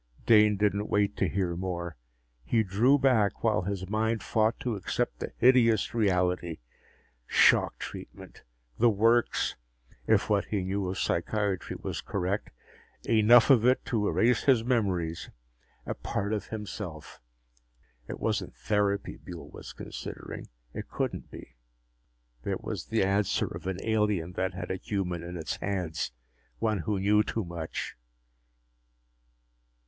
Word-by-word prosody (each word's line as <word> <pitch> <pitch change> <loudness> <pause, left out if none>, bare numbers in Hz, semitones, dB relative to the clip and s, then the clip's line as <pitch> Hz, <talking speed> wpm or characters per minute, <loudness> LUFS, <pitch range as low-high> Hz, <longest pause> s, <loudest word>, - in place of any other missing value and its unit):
Dane 105 -2 +6
didn't 105 0 0
wait 100 0 +1
to 95 - +1
hear 90 0 -1
more. 85 -1 -4 0.5
He 110 - +2
drew 110 +9 +3
back, 125 -7 +2
while 110 -2 +3
his 95 0 -4
mind 110 +2 0
fought 110 0 +1
to 120 -3 -1
accept 100 - -2
the - - -5
hideous 115 -4 +4
reality. 90 -6 +1 0.7
Shock - - +4
treatment! - - -9 0.4
The 120 - +6
works, 115 +3 +2 0.5
if - - +3
what - - +2
he 100 -3 -2
knew 95 0 -2
of 95 - -4
psychiatry 100 +2 -1
was - - -4
correct. 100 +1 -2 0.6
Enough 115 +4 +6
of 120 -5 +6
it 125 +2 +3
to 105 -4 0
erase 120 +1 +2
his 130 -5 +4
memories 95 -9 -1 0.6
a - - -2
part 100 +2 -3
of 105 -3 -3
himself. 105 - -7 0.9
It - - -6
wasn't - - -2
therapy 100 -1 0
Buehl 90 -2 -10
was - - -9
considering; - - -8 0.3
it - - -6
couldn't - - -3
be. - - -12 0.9
It - - -3
was - - -5
the 115 -3 +1
answer 100 +1 +1
of - - -7
an 95 -2 -2
alien 105 -6 +1
that 95 0 -2
had 90 -1 -5
a 95 - -1
human 90 -4 -3
in 85 +1 -6
its 80 -2 -4
hands 90 -9 -2 0.5
one 110 -3 0
who 100 +4 -1
knew 105 +2 +4
too 110 0 -2
much! 85 -2 -5
100 Hz, 140 wpm, -29 LUFS, 90-110 Hz, 0.9 s, Dane